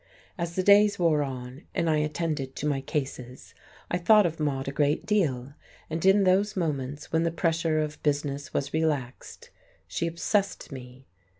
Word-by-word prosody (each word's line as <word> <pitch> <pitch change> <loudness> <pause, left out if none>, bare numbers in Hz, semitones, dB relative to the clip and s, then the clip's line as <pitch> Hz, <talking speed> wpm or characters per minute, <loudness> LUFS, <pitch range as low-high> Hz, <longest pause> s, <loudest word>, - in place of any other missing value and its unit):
As 170 -2 -4
the 185 - 0
days 205 +1 +6
wore 165 -4 +3
on, 130 0 -6
and 170 - +1
I 155 -1 +3
attended 150 -3 -2
to - - -4
my 140 -2 0
cases, 130 -4 -5 0.4
I 175 - +1
thought 210 +3 +6
of 165 -1 -2
Maude 135 -3 -1
a - - -1
great 145 +1 +1
deal, 140 -11 0 0.4
and 160 +1 -2
in 195 +1 +5
those 195 +2 +2
moments 145 -4 -3
when 160 - +2
the 165 - +1
pressure 165 -1 0
of 150 -1 -2
business 145 -2 -1
was 140 - -2
relaxed, 150 -6 -3 0.4
she 170 - -2
obsessed 195 +4 -1
me. 130 0 -10
155 Hz, 170 wpm, -27 LUFS, 140-170 Hz, 0.4 s, days